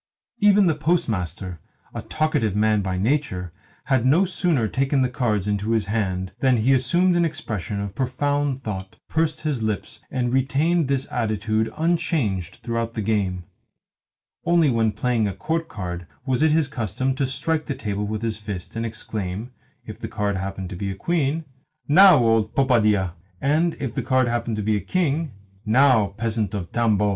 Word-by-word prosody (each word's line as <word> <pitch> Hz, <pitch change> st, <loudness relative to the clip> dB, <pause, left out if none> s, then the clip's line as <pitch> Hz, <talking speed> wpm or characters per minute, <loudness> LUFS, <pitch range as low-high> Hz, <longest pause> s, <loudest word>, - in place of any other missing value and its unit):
Even 205 Hz, -1 st, +5 dB
the 165 Hz, -, +3 dB
Postmaster 100 Hz, -, -1 dB, 0.3 s
a -, -, -4 dB
talkative 115 Hz, -10 st, 0 dB
man 105 Hz, 0 st, +3 dB
by 95 Hz, -1 st, -2 dB
nature 95 Hz, -, -1 dB, 0.3 s
had 130 Hz, -4 st, +1 dB
no 155 Hz, +10 st, +4 dB
sooner 175 Hz, -, 0 dB
taken 135 Hz, +3 st, +1 dB
the 130 Hz, -, +1 dB
cards 110 Hz, -6 st, -1 dB
into 105 Hz, +1 st, -1 dB
his 110 Hz, -3 st, +1 dB
hands 95 Hz, -3 st, -2 dB
than 130 Hz, -1 st, +3 dB
he 120 Hz, +5 st, +3 dB
assumed 170 Hz, +8 st, +3 dB
an 175 Hz, -, +3 dB
expression 110 Hz, -, -3 dB
of 100 Hz, -1 st, -4 dB
profound 135 Hz, +2 st, -1 dB
thought, 95 Hz, -3 st, -5 dB
pursed 160 Hz, 0 st, 0 dB
his 150 Hz, -6 st, -1 dB
lips, 110 Hz, +1 st, -3 dB
and 125 Hz, -1 st, -1 dB
retained 145 Hz, +5 st, +2 dB
this 135 Hz, -1 st, 0 dB
attitude 110 Hz, -1 st, 0 dB
unchanged 155 Hz, -, 0 dB
throughout 115 Hz, -1 st, -2 dB
the 110 Hz, -, -2 dB
game. 95 Hz, -4 st, 0 dB, 1.0 s
Only 170 Hz, -4 st, +3 dB
when 115 Hz, -2 st, +2 dB
playing 115 Hz, 0 st, 0 dB
a 100 Hz, -, -4 dB
court 165 Hz, 0 st, -2 dB
card 90 Hz, -, -6 dB, 0.2 s
was 130 Hz, 0 st, 0 dB
it 160 Hz, -, +5 dB
his 155 Hz, -1 st, +2 dB
custom 130 Hz, 0 st, -2 dB
to 135 Hz, 0 st, -1 dB
strike 155 Hz, +4 st, -1 dB
the 140 Hz, -, -2 dB
table 105 Hz, -1 st, -3 dB
with 110 Hz, +1 st, -3 dB
his 110 Hz, -2 st, -1 dB
fist, 100 Hz, -3 st, -6 dB
and 115 Hz, -, -2 dB
to 115 Hz, -, -1 dB
exclaim 110 Hz, 0 st, -4 dB, 0.3 s
(if -, -, -9 dB
the -, -, -5 dB
card 100 Hz, -1 st, -1 dB
happened 95 Hz, -1 st, -4 dB
to -, -, -5 dB
be 100 Hz, +2 st, -3 dB
a 95 Hz, -, -4 dB
queen), 160 Hz, -, 0 dB, 0.4 s
"Now, 185 Hz, +3 st, +8 dB
old 115 Hz, -3 st, +2 dB
popadia 110 Hz, -9 st, +3 dB, 0.2 s
!" 90 Hz, -, -35 dB
and 155 Hz, -, +1 dB
(if 130 Hz, -5 st, -3 dB
the 135 Hz, -, -1 dB
card 130 Hz, +1 st, +2 dB
happened 120 Hz, -1 st, -1 dB
to 105 Hz, -, -3 dB
be 110 Hz, +1 st, +1 dB
a -, -, -3 dB
king), 155 Hz, -, -1 dB, 0.3 s
"Now, 120 Hz, -1 st, +4 dB
peasant 110 Hz, -3 st, -1 dB
of 90 Hz, -4 st, -5 dB
Tambov!" 105 Hz, -3 st, +2 dB
115 Hz, 180 wpm, -23 LUFS, 105-145 Hz, 1.0 s, Now